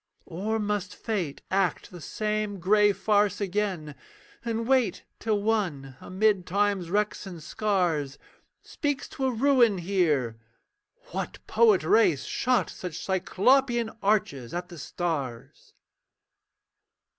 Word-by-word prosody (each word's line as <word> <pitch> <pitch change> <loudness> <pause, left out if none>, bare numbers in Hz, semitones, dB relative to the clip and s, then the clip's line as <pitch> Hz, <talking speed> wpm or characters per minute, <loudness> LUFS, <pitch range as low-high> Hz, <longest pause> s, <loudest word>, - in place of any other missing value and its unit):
Or 200 +6 -2
must 205 -2 -2
Fate 185 -11 -3
act 190 -3 0
the 175 -2 -10
same 210 +3 -2
grey 205 +3 +4
farce 205 0 +1
again, 190 -6 -2 0.5
And 230 -1 -2
wait, 260 -3 +2 0.2
till 215 -2 0
one, 175 -12 -1
amid 195 -1 +1
Time's 200 -2 0
wrecks 210 +1 -1
and 170 -4 -9
scars, 170 -9 -1 0.5
Speaks 290 -2 -3
to 265 - -2
a - - +1
ruin 240 -4 +4
here, 160 - 0 0.7
'What - - -4
poet 435 -5 +4
race 180 -12 +3
Shot 245 - +1
such 180 -3 -6
cyclopean 235 +6 +2
arches 170 - 0
at 175 0 -4
the 170 -3 -10
stars?' 140 -8 -4
200 Hz, 115 wpm, -27 LUFS, 175-220 Hz, 0.7 s, grey